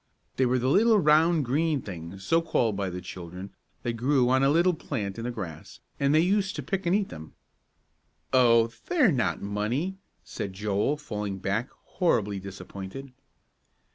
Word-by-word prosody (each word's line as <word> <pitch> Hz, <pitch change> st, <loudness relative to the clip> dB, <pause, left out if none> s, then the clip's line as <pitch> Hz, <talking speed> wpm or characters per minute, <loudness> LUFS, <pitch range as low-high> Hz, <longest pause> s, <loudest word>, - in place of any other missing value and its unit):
They 130 Hz, -, +3 dB
were 125 Hz, +1 st, +2 dB
the 125 Hz, +1 st, 0 dB
little, 215 Hz, -, +5 dB
round, 155 Hz, -2 st, +4 dB
green 150 Hz, +2 st, 0 dB
things, 90 Hz, 0 st, -8 dB
so 165 Hz, -, +3 dB
called 120 Hz, -10 st, 0 dB
by 100 Hz, -1 st, -2 dB
the 90 Hz, 0 st, -6 dB
children, 90 Hz, +1 st, -8 dB, 0.3 s
that 120 Hz, -, -1 dB
grew 125 Hz, +2 st, +2 dB
on 130 Hz, 0 st, +4 dB
a 135 Hz, -, +4 dB
little 170 Hz, +4 st, +4 dB
plant 110 Hz, -, -4 dB
in 115 Hz, -, -5 dB
the -, -, -1 dB
grass, 90 Hz, -10 st, -7 dB, 0.2 s
and 140 Hz, 0 st, +2 dB
they 155 Hz, +1 st, +5 dB
used 195 Hz, +2 st, +1 dB
to -, -, -4 dB
pick 195 Hz, -3 st, -2 dB
and 175 Hz, -, +3 dB
eat 205 Hz, -2 st, 0 dB
them. 80 Hz, 0 st, -10 dB, 1.0 s
"Oh, 115 Hz, -3 st, +5 dB, 0.2 s
they're 295 Hz, -, +4 dB
not 125 Hz, -9 st, 0 dB
money," 120 Hz, -, -2 dB, 0.2 s
said 100 Hz, -, -5 dB
Joel, 105 Hz, +8 st, 0 dB
falling 105 Hz, -9 st, -4 dB
back, 100 Hz, +6 st, -2 dB
horribly 105 Hz, -, 0 dB
disappointed. 100 Hz, +6 st, -8 dB
125 Hz, 170 wpm, -27 LUFS, 100-155 Hz, 1.0 s, little